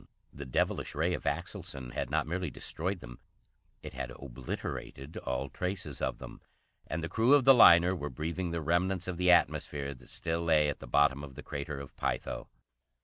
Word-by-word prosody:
The 70 -1 -8
devilish 65 - 0
ray 85 +4 +1
of - - -4
Axelson 80 -4 -3
had - - -2
not 80 +2 +1
merely 90 +2 -2
destroyed 90 +5 -3
them, - - -10 0.6
it - - -7
had 65 -1 -4
obliterated 65 +3 -6
all 65 +1 -2
traces 90 -1 -4
of - - -1
them, - - -10 0.5
and 80 +1 -3
the - - -1
crew 115 +10 +4
of 145 - +4
the 135 - +10
liner 90 -6 +7
were 75 -4 -4
breathing 85 +7 -3
the 85 0 -2
remnants 90 +4 +1
of 90 -2 -3
the 90 0 +2
atmosphere 70 -5 +2
that 65 - -16
still 85 0 -2
lay 75 -3 +4
at 75 - -4
the - - -9
bottom 70 -1 +3
of 70 -2 -9
the - - -9
Crater 70 0 -5
of 70 -1 -10
Pytho. - - -2
80 Hz, 190 wpm, -31 LUFS, 70-90 Hz, 0.6 s, the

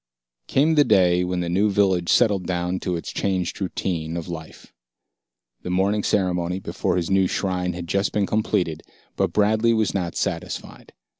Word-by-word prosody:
Came 150 +4 +3
the 150 -2 +5
day 90 -6 +3
when 90 0 -2
the 85 - -2
new 100 +5 +2
village 95 -3 +2
settled 100 -7 +3
down 90 0 -1
to 90 - -2
its 85 - -5
changed 95 0 -2
routine 85 -3 -3
of 85 - -5
life. 80 -2 -9 0.9
The - - -6
morning 100 +3 +1
ceremony 90 -3 0
before - - -2
his 85 +1 -2
new 95 -1 +4
shrine 90 -2 -1
had 85 0 -6
just 100 +4 0
been 105 -1 +1
completed, 90 -7 -1 0.3
but - - 0
Bradley 110 +2 +3
was 110 -3 +1
not 90 -4 -2
satisfied. - - -4
90 Hz, 165 wpm, -23 LUFS, 90-100 Hz, 0.9 s, the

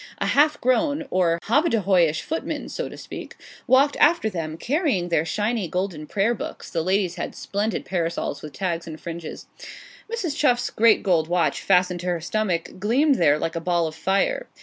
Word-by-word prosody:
A - - -2
half 295 +1 +3
grown, 285 +4 +1
or 170 -2 +2
hobbadehoyish 200 - +2
footman, 320 - -4
so - - -4
to - - -10
speak, - - -9 0.3
walked 275 +2 +4
after 300 -8 +3
them, 160 -3 -4
carrying 260 - 0
their 165 -2 +1
shining 210 0 -1
golden 180 -4 -3
prayer 210 +6 +1
books - - -7
the 165 - 0
ladies 185 0 0
had - - -5
splendid 205 +2 -2
parasols 170 -5 -2
with 150 - -8
tags 170 -2 -3
and 155 -1 -8
fringes. 170 -1 -7 0.7
Mrs. 370 -11 -2
Chuff's 245 -5 +2
great 225 0 +4
gold 170 -6 +2
watch, 170 -4 +1
fastened 180 -1 +2
to 180 - -6
her 175 -1 0
stomach, 185 -1 -2
gleamed 260 +8 +2
there 150 -3 +4
like 165 +2 -3
a 165 - -2
ball 175 -1 +1
of 160 - -4
fire. 350 - 0
190 Hz, 175 wpm, -23 LUFS, 170-245 Hz, 0.7 s, walked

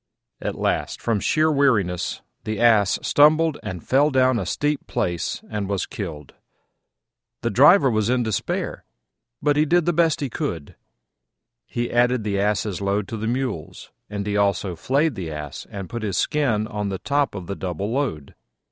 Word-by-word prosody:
At - - -3
last, - - -1
from 115 -3 0
sheer 155 +8 +2
weariness, 105 - +1 0.2
the 110 -1 -3
Ass 110 -5 +4
stumbled 155 +1 +4
and 90 -3 -7
fell 140 +3 +4
down 130 -3 +3
a - - -4
steep 145 -1 -1
place 85 -1 -2
and 105 -2 -4
was 100 -3 -1
killed. 75 -2 -7 1.1
The 115 - 0
driver 145 - +6
was 110 -3 +1
in 125 -1 +2
despair, 110 -2 -2 0.6
but 145 -1 +3
he 150 - +4
did 175 +1 +3
the 175 - +2
best 165 -2 +2
he 140 - -1
could: 85 - -4 0.9
he 120 0 -3
added 120 -1 +3
the 100 -2 -1
Ass's 100 -1 0
load 100 +1 0
to 115 - -4
the 110 +1 -3
Mule's, 125 - -4 0.2
and 100 -1 -4
he 105 0 -1
also 100 -2 +1
flayed 140 - +1
the 95 -7 -5
Ass 75 -2 -7
and 100 -2 -6
put 120 -1 -5
his 100 -4 -2
skin 125 -8 +1
on 105 -2 -3
the 95 - -3
top 140 +2 0
of 95 -3 -6
the 100 - -4
double 95 +3 -4
load. 120 - -2
110 Hz, 175 wpm, -23 LUFS, 100-140 Hz, 1.1 s, driver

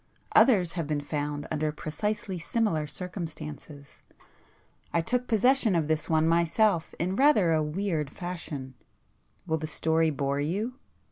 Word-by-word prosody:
Others 215 -8 +6
have 170 -4 -3
been 150 -1 -1
found 145 0 -3
under 155 0 0
precisely 185 +5 -3
similar 170 -4 0
circumstances. 155 -4 -8 0.9
I 170 - +2
took 250 +7 -1
possession 235 -2 +3
of 160 -3 +1
this 155 -1 -1
one 160 0 +3
myself 170 +2 +2
in 185 +3 -1
rather 260 - +4
a 155 - +2
weird 155 -1 -2
fashion,—will 145 - -7
the 155 - -4
story 160 +1 +2
bore 140 -1 -1
you?" 200 - -1
165 Hz, 130 wpm, -28 LUFS, 150-195 Hz, 0.9 s, Others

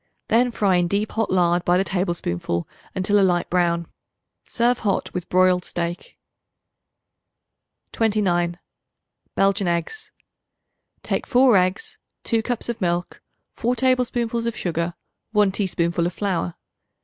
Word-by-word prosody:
Then 245 +2 +4
fry 200 -5 +2
in 175 0 +2
deep 205 +4 -1
hot 225 -1 -1
lard 175 -1 +2
by 175 0 +3
the 190 - +2
tablespoonful 170 - -2 0.3
until 200 +2 +2
a - - +4
light 180 -2 +1
brown. 170 -1 +1 0.6
Serve 240 +1 +1
hot 205 -3 -1
with 180 -1 -5
broiled 185 0 +3
steak. 175 0 -4 1.7
29. 180 -6 +1 0.8
Belgian 195 -1 +2
Eggs. 175 - -3 0.9
Take - - -2
4 250 -2 +5
eggs, 185 +1 0 0.2
2 225 -1 +1
cups 240 0 -3
of 235 -2 -4
milk, 175 0 -2 0.3
4 245 +2 -1
tablespoonfuls 240 -2 +1
of 230 - -3
sugar, 170 0 -2 0.4
1 210 -2 +4
teaspoonful 170 -3 0
of 175 - -5
flour. 185 - -2
190 Hz, 125 wpm, -22 LUFS, 175-225 Hz, 1.7 s, 4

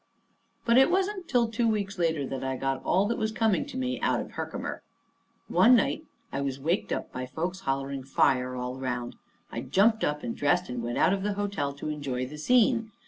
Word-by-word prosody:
But 235 +2 +6
it 265 - +6
wasn't 380 0 0
till 240 -3 +3
two 230 +1 0
weeks 200 -3 -1
later 160 -4 +1
that 135 0 -4
I 130 0 -2
got 135 0 -2
all 190 +2 +3
that 230 - -1
was 220 -1 0
coming 220 +2 +1
to 275 - -7
me 255 0 -2
out - - +2
of - - -6
Herkimer. - - -5 0.7
One 250 +2 +6
night 305 +6 +1 0.3
I 140 - -1
was 135 -1 -2
waked 165 +8 -1
up - - -3
by 125 0 -5
folks 170 +8 -3
hollering 135 -2 -2
"Fire!" 130 -1 +2
all 125 +1 -4
around. 125 -2 -3 0.4
I 115 - -4
jumped 200 - +3
up 150 0 -1
and 115 - -3
dressed 175 +5 +1
and 125 -1 -3
went 120 +1 -3
out - - +4
of 195 - -1
the 205 +1 -1
hotel 200 -8 -1
to 145 +2 -5
enjoy 140 -4 -2
the 150 +4 -9
scene. 230 - +3
165 Hz, 210 wpm, -28 LUFS, 135-225 Hz, 0.7 s, But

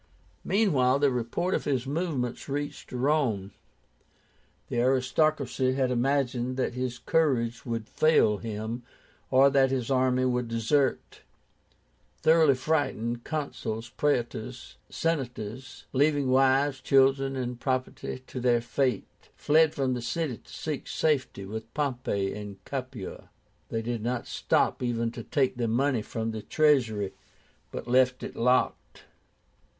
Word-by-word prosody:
Meanwhile 140 - +3
the 140 -1 +3
report 125 +10 -1
of - - -1
his 130 -3 0
movements 140 -5 -2
reached 145 +1 -4
Rome. 125 -7 0 1.2
The 120 - -2
aristocracy 130 +1 +1
had 130 -1 +1
imagined 130 -1 0
that 130 - -1
his 125 0 -3
courage 125 -8 0
would 115 -2 -3
fail 155 -10 +3
him, 110 +3 -4 0.5
or 135 +1 +5
that 135 -1 +4
his 130 -1 -2
army 130 -1 +2
would 125 -1 0
desert. 115 +5 0 1.0
Thoroughly 160 -3 +5
frightened, 125 -5 -1
Consuls, 120 -7 -4
Praetors, 125 -3 -2
Senators, 130 -5 -3
leaving 140 -1 +2
wives, 135 +1 +3
children, 135 0 +3
and 125 -2 -3
property 130 0 -3
to 130 - -6
their 120 -1 +3
fate, 120 -1 -2
fled 155 +1 +4
from 135 -3 0
the 125 - -3
city 140 0 -2
to - - -19
seek 155 -3 -4
safety 135 -10 0
with 110 +3 -7
Pompey 125 -9 -1
in 105 -2 -7
Capua. 130 -7 -6 0.4
They 115 0 -2
did 120 -1 -3
not 120 +2 -2
stop - - +1
even 115 -2 -1
to - - -7
take 135 -4 0
the 120 -2 0
money 125 +1 +1
from 115 +1 -3
the 110 -1 -5
treasury, 115 -8 +2 0.6
but - - -7
left 130 +1 +3
it - - -6
locked. 125 +2 0
130 Hz, 130 wpm, -28 LUFS, 120-140 Hz, 1.2 s, or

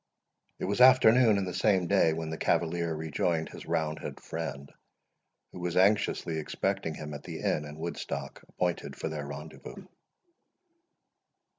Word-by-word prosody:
It - - -3
was 100 +6 0
afternoon 125 -3 +7
in 100 - 0
the 90 - -4
same 95 0 +2
day 80 -1 +4
when 80 0 -3
the 80 - -4
cavalier 85 -1 0
rejoined 80 +1 -1
his - - -10
round 80 -2 -1
head - - -7
friend, 75 -4 -6 0.8
who - - -9
was 90 0 -2
anxiously 95 -4 +2
expecting 95 +1 -2
him 75 -1 -7
at 75 - -6
the - - -7
inn 75 - 0
in 75 0 -9
Woodstock 70 -4 -5
appointed 90 -1 -2
for - - -4
their 75 -2 -5
rendezvous. 75 +2 -9
80 Hz, 150 wpm, -29 LUFS, 75-95 Hz, 0.8 s, afternoon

